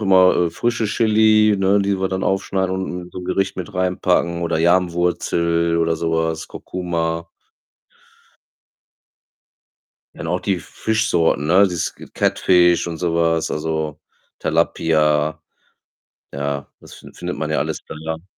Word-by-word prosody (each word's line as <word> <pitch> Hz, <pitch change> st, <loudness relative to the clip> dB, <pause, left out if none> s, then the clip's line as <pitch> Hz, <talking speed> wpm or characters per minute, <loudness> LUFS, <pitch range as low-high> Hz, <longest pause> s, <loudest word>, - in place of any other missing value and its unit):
immer, 95 Hz, -3 st, +5 dB
äh, -, -, -3 dB
frische 120 Hz, +6 st, -1 dB
Chili, 110 Hz, -1 st, +4 dB
ne, 95 Hz, +1 st, +3 dB
die 100 Hz, -1 st, 0 dB
wir 95 Hz, 0 st, 0 dB
dann 95 Hz, 0 st, -3 dB
aufschneiden 95 Hz, -1 st, 0 dB
und 95 Hz, -1 st, -4 dB
in 90 Hz, -, -12 dB
so -, -, -8 dB
'n 90 Hz, -, -7 dB
Gericht 95 Hz, +1 st, -1 dB
mit 95 Hz, +2 st, -6 dB
reinpacken 90 Hz, -1 st, 0 dB
oder 85 Hz, -1 st, 0 dB
Yam-Wurzel 85 Hz, -1 st, +1 dB
oder 80 Hz, 0 st, +1 dB
so 80 Hz, +1 st, -2 dB
was, 80 Hz, 0 st, -1 dB
Kurkuma. 85 Hz, -2 st, -3 dB, 2.9 s
Ja, -, -, -13 dB
und -, -, -4 dB
auch 90 Hz, +2 st, -1 dB
die 100 Hz, -2 st, 0 dB
F 85 Hz, -, -9 dB
Fischsorten, 105 Hz, -9 st, 0 dB
ne, 90 Hz, +5 st, +5 dB
dieses 90 Hz, -3 st, -3 dB, 0.2 s
Catfish 90 Hz, -2 st, +3 dB
und 85 Hz, -2 st, -5 dB
so 85 Hz, -2 st, -1 dB
was, 80 Hz, -1 st, +1 dB
also 75 Hz, -1 st, -3 dB, 0.4 s
Tilapia. 75 Hz, -1 st, +1 dB, 0.9 s
Ja, 70 Hz, 0 st, -3 dB
das -, -, -14 dB
fin -, -, -14 dB
findet -, -, -5 dB
man -, -, -3 dB
ja -, -, +1 dB
alles -, -, -2 dB
dann 75 Hz, -, -8 dB
da. 80 Hz, +1 st, -4 dB
85 Hz, 145 wpm, -20 LUFS, 80-95 Hz, 2.9 s, immer